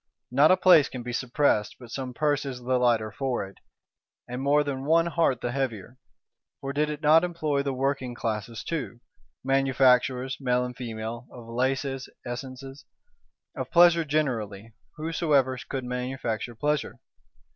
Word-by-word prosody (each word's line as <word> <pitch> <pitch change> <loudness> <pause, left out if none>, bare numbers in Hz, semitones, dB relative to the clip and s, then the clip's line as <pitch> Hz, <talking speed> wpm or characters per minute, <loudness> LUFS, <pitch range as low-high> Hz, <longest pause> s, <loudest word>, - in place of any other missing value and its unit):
Not 140 +4 +5
a 185 - +5
place 175 -6 +6
can 125 -2 -7
be 120 0 -5
suppressed, 125 -4 +1
but 120 -3 -12
some 130 0 -4
purse 145 0 +1
is 135 -3 -5
the 125 +1 0
lighter 115 -3 +2
for 125 -1 -2
it; 95 - -15 0.7
and 125 +1 -5
more 145 +2 +3
than 135 -2 -4
one 165 +3 +3
heart 165 -7 +1
the 120 - -2
heavier; 125 -3 -4 0.6
for 135 0 -5
did 150 +1 +1
it 150 +1 -6
not 155 +3 +6
employ 155 -5 -1
the 140 0 -2
working 130 -1 -2
classes 110 -1 -4
too,—manufacturers, 130 0 0
male 125 -2 +1
and 125 0 -7
female, 115 0 -6
of 120 -2 -11
laces, 135 +2 -1 0.2
essences; 130 +2 -7 0.7
of - - -4
Pleasure 170 -1 +6
generally, 115 -9 -2 0.2
whosoever 155 -5 +1
could 130 -2 -3
manufacture 125 -2 -3
Pleasure? 150 +5 -1
130 Hz, 145 wpm, -26 LUFS, 120-145 Hz, 0.7 s, place